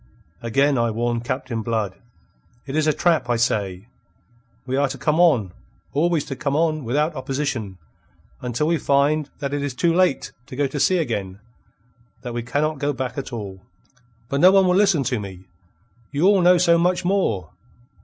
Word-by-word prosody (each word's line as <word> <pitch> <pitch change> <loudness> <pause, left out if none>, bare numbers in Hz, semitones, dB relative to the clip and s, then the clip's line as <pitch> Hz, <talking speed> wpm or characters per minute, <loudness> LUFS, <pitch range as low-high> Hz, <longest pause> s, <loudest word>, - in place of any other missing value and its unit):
Again 135 +3 +2
I 115 0 +2
warn 120 +1 -1
Captain 130 -1 -3
Blood. 110 -4 -2 0.7
It 135 +1 -5
is 155 0 +1
a - - +5
trap, 160 -4 +1
I 120 - +2
say. 100 -5 -1 0.8
We 130 0 -2
are 140 +1 +2
to 135 +1 -6
come 150 +4 0
on; 125 - +3 0.4
always 160 +1 +1
to 135 - -5
come 140 +1 -2
on, 155 -1 +1
without 150 +7 0
opposition, 130 -7 -3 0.6
until 125 +3 -1
we 165 0 +1
find 145 +2 +1
that 140 -1 -4
it 145 - -1
is 140 -3 -3
too 165 +6 +2
late 180 -5 +1 0.2
to - - -9
go 145 +2 +1
to 140 +2 -3
sea 185 +6 +3
again, 100 - -3 0.8
that 120 -2 -5
we 120 - -2
cannot 145 +5 -1
go 145 +1 0
back 130 -1 -4
at 140 - -5
all. 100 -5 -7 0.7
But 140 +3 -1
no 185 - +8
one 195 -1 +5
will 180 - +3
listen 190 -7 +3
to 130 -3 -1
me. 95 -2 -9 0.6
You 145 +5 0
all 200 -1 +5
know 180 +1 +6
so 170 -1 +4
much 180 +1 +1
more. 175 - 0
140 Hz, 185 wpm, -22 LUFS, 120-155 Hz, 0.8 s, no